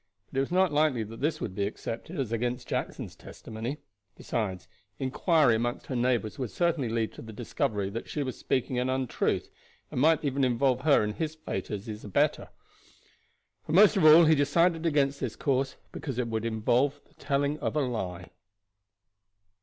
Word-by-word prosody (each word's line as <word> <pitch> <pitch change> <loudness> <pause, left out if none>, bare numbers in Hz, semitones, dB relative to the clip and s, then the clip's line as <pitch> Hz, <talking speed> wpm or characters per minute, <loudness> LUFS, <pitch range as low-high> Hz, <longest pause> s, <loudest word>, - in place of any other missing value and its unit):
But - - -4
it - - +4
was 135 - -3
not 185 -3 +3
likely 145 -6 +2
that 115 +3 -10
this 155 +1 0
would 95 - -4
be 100 +1 -1
accepted 120 - -6
as 125 -5 -2
against 120 +2 -2
Jackson's - - -4
testimony; 115 +6 -7 0.4
besides, 95 -6 -3 0.3
inquiry 135 +1 +3
among 120 +1 -2
her 130 - -6
neighbors 120 0 0
would 125 -4 -2
certainly 165 -6 0
lead 115 -1 -1
to - - -10
the 110 - -9
discovery 110 -3 -2
that 115 +3 -6
she 150 - -2
was 130 -2 -4
speaking 130 -1 -1
an 125 +1 0
untruth, 130 -2 -1 0.4
and 125 - -1
might 160 +1 +4
even 140 0 0
involve 125 0 +2
her 140 -3 +4
in 105 0 -2
his 155 +5 -3
fate 125 - -5
as 105 0 -4
his 110 -2 -7
abettor. 100 - 0 1.2
But 155 - 0
most 210 +3 +7
of 190 - +2
all 155 +2 +9
he 160 - +6
decided 165 +3 +2
against 140 -3 +1
this 130 -5 -3
course 135 -1 0 0.2
because 135 -6 -5
it 125 -2 -1
would 110 0 -2
involve 120 +6 +1
the - - -28
telling 145 +1 0
of - - -2
a 150 - +2
lie. 95 - -4
130 Hz, 185 wpm, -28 LUFS, 115-150 Hz, 1.2 s, all